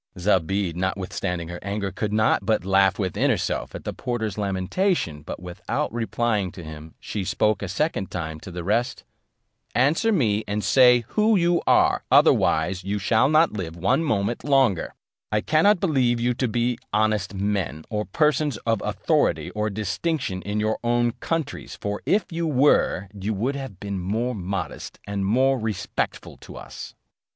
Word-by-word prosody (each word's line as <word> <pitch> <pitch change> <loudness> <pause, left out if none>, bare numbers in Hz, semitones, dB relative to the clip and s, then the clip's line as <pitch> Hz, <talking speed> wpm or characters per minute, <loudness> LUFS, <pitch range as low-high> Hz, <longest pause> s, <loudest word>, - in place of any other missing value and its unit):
Zobeide, 95 -1 +1
notwithstanding 90 -2 -3
her 85 0 -6
anger, 100 -1 -3
could 105 +3 -3
not 110 -1 +2
but 110 -3 0
laugh 95 0 +3
within 95 -4 0
herself - - -1
at - - -7
the - - -4
porter's 110 -5 -3
lamentation: 100 - -1
but 75 - -7
without 90 +3 -4
replying 115 -4 -1
to 90 - -9
him, 80 0 -10
she 105 - -4
spoke 105 +3 +1
a 100 - -3
second 100 - -1
time 80 -3 -5
to 95 - -10
the 90 -1 -6
rest; 115 +6 0 0.7
"Answer 150 - +3
me, 110 - +1
and 105 +1 -2
say 125 -2 +6
who 215 +1 +3
you 175 -2 +2
are, - - +4
otherwise 90 +4 +3
you 100 +2 -2
shall 110 +6 +2
not 155 -1 +4
live 90 -6 -5
one 95 - +1
moment 110 -4 -1
longer: 135 - +2 0.4
I 105 - +2
cannot 175 - +3
believe 130 -9 +2
you 120 +1 +1
to 125 +1 -1
be 120 +1 0
honest 105 -2 +1
men, 95 -7 -2
or 105 -1 -1
persons 150 -4 +1
of 115 -3 +1
authority - - 0
or 105 0 -1
distinction 105 - -2
in 105 +2 -3
your 110 +1 0
own 120 0 +2
countries; 165 -3 -3
for 105 0 -3
if 210 - +3
you 165 0 -2
were, 135 - +3
you 105 +1 -3
would 125 +8 -1
have 135 -9 -7
been 100 -2 -4
more 110 +7 -1
modest 95 -3 -5
and 100 -1 -2
more 130 +5 +3
respectful 110 -3 -3
to - - -12
us." - - -9
105 Hz, 165 wpm, -24 LUFS, 95-125 Hz, 0.7 s, say